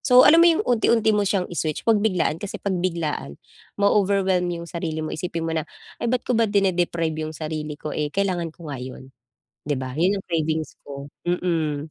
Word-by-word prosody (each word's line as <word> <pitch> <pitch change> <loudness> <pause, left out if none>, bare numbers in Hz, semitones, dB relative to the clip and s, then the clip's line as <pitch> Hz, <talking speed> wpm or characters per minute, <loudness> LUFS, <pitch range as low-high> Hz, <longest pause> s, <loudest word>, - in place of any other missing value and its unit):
So 250 -1 +7
alam 325 +3 +8
mo 340 - +8
'yong, 335 +5 +2
unti-unti 230 -2 +3
mo 205 -1 +2
siyang 190 -2 +1
i-switch, 155 -3 -2
'wag 225 -2 +4
biglaan 185 -6 +1
kasi 205 - -5
pagbiglaan, 170 - -2 0.4
ma-o-overwhelm 195 -3 +2
'yong 170 -1 -4
sarili 160 -2 -3
mo 155 - -4
isipin 165 0 -3
mo 165 - -1
na 160 -1 -2 0.3
"Ay 235 - 0
ba't 250 +1 0
ko - - 0
ba 230 -2 +3
dine-deprive 175 -5 +1
'yong 155 0 -4
sarili 155 -1 -4
ko, 150 0 -6
eh, 150 -1 -1
kailangan 180 -1 -1
ko 160 -2 -9
nga 130 - -5
'yon, 130 +1 -9 0.6
'di 145 - +1
ba, 130 0 -4
'yun 175 +8 +2
'yung 195 - -6
cravings 160 -2 -1 0.2
ko," 140 0 -8 0.2
mm. 160 -4 -1
170 Hz, 195 wpm, -23 LUFS, 155-200 Hz, 0.6 s, alam